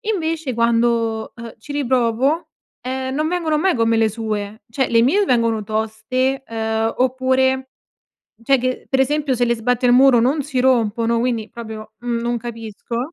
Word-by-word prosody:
Invece, 325 Hz, -9 st, -2 dB
quando, 230 Hz, -1 st, +1 dB
uhm, 230 Hz, -1 st, -9 dB
ci 285 Hz, +7 st, -9 dB
riprovo, 260 Hz, +2 st, +1 dB, 0.3 s
ehm, 260 Hz, +1 st, -3 dB
non 305 Hz, +2 st, 0 dB
vengono 330 Hz, -3 st, 0 dB
mai 375 Hz, +4 st, +2 dB
come 230 Hz, -2 st, +2 dB
le 225 Hz, -1 st, +3 dB
sue. 215 Hz, -1 st, -4 dB
Cioè, 265 Hz, +2 st, 0 dB
le 230 Hz, -, +4 dB
mie 365 Hz, -, +3 dB
vengono 230 Hz, -, +1 dB
toste, 220 Hz, +5 st, -1 dB
uhm, 220 Hz, 0 st, -1 dB
oppure, 260 Hz, +1 st, +1 dB, 0.7 s
cioè, 270 Hz, +3 st, +3 dB
che, 255 Hz, +1 st, -3 dB
per 265 Hz, -, +2 dB
esempio, 285 Hz, 0 st, +1 dB
se 245 Hz, -, +2 dB
le 235 Hz, 0 st, +1 dB
sbatti 245 Hz, +2 st, 0 dB
al 245 Hz, -, +5 dB
muro 255 Hz, -1 st, +6 dB
non 275 Hz, +6 st, +1 dB
si 270 Hz, -2 st, -4 dB
rompono, 230 Hz, -2 st, +2 dB
quindi 230 Hz, -3 st, -1 dB
proprio, 220 Hz, -2 st, -9 dB
mhmm, 240 Hz, -1 st, -2 dB
non 240 Hz, 0 st, -1 dB
capisco. 235 Hz, +4 st, -6 dB
240 Hz, 165 wpm, -20 LUFS, 225-265 Hz, 0.7 s, muro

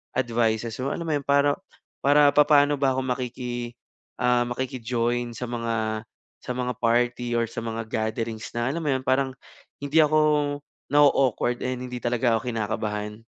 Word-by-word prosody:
advices 115 Hz, -2 st, 0 dB
mo 140 Hz, -, -1 dB
alam 170 Hz, -, -4 dB
mo -, -, -1 dB
yun 140 Hz, -, -3 dB
para 140 Hz, 0 st, +4 dB, 0.5 s
para 145 Hz, +1 st, +6 dB
papaano 145 Hz, -1 st, +5 dB
ba 135 Hz, -2 st, +2 dB
ako 130 Hz, -, 0 dB
makiki, 125 Hz, -1 st, -4 dB, 0.5 s
ah, 125 Hz, 0 st, +3 dB
makiki-join 120 Hz, -1 st, -2 dB
sa -, -, -5 dB
mga 115 Hz, -2 st, -2 dB, 0.4 s
sa -, -, -4 dB
mga 125 Hz, 0 st, -2 dB
party 120 Hz, +1 st, +1 dB
or 115 Hz, -1 st, +1 dB
sa -, -, -4 dB
mga 115 Hz, 0 st, -3 dB
gatherings 110 Hz, 0 st, -3 dB
na 120 Hz, +2 st, 0 dB
alam 170 Hz, -, -3 dB
mo -, -, +1 dB
yun, 130 Hz, -, -2 dB
parang 130 Hz, 0 st, +2 dB, 0.5 s
hindi 145 Hz, +3 st, +2 dB
ako 155 Hz, +1 st, +2 dB, 0.7 s
na-o-awkward 135 Hz, -4 st, +3 dB
and 125 Hz, 0 st, -3 dB
hindi 125 Hz, 0 st, -6 dB
talaga 120 Hz, -1 st, +2 dB
ako 125 Hz, -, -9 dB
kinakabahan. 105 Hz, -1 st, -3 dB
120 Hz, 155 wpm, -25 LUFS, 115-130 Hz, 0.7 s, para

